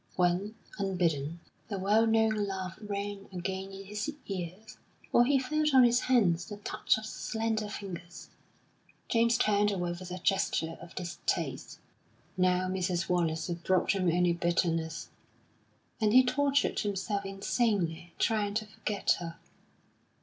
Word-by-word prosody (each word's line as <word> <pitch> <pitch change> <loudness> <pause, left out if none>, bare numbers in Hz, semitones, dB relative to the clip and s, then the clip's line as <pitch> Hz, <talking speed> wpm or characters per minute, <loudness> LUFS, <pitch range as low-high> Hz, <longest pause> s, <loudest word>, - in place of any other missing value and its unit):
When, 180 +4 +1 0.2
unbidden, 170 -5 0 0.3
the 200 - -3
well 210 +4 +3
known 220 -2 +2
laugh 190 -1 -4
rang 200 -1 -4
again 190 +1 -4
in 195 0 -9
his 210 +9 -3
ears, 190 +3 -6 0.3
or 240 - +6
he 280 +2 +4
felt 300 +2 +1
on 260 - +9
his 240 0 +5
hands 195 -11 +3
the 205 - -7
touch 205 - 0
of 220 - -6
the - - -6
slender 220 -2 -2
fingers, 175 -4 -8 0.8
James 235 0 +3
turned 205 -1 +3
away 175 -3 -1
with 175 +1 -7
a 180 - -4
gesture 175 -3 0
of 175 -1 -12
distaste. 175 -1 -3 0.6
Now 185 0 +2
Mrs. 185 -2 -1
Wallace 165 -3 +1
brought 175 +2 +1
him 185 -3 +1
only 175 0 +3
bitterness, 170 -1 0 0.9
and 210 -1 +3
he 255 +1 +8
tortured 280 +2 +2
himself 200 0 -1
insanely 195 -4 -1
trying 210 -2 +1
to 215 0 0
forget 210 -1 0
her.... 170 -1 -6
195 Hz, 140 wpm, -30 LUFS, 175-215 Hz, 0.9 s, on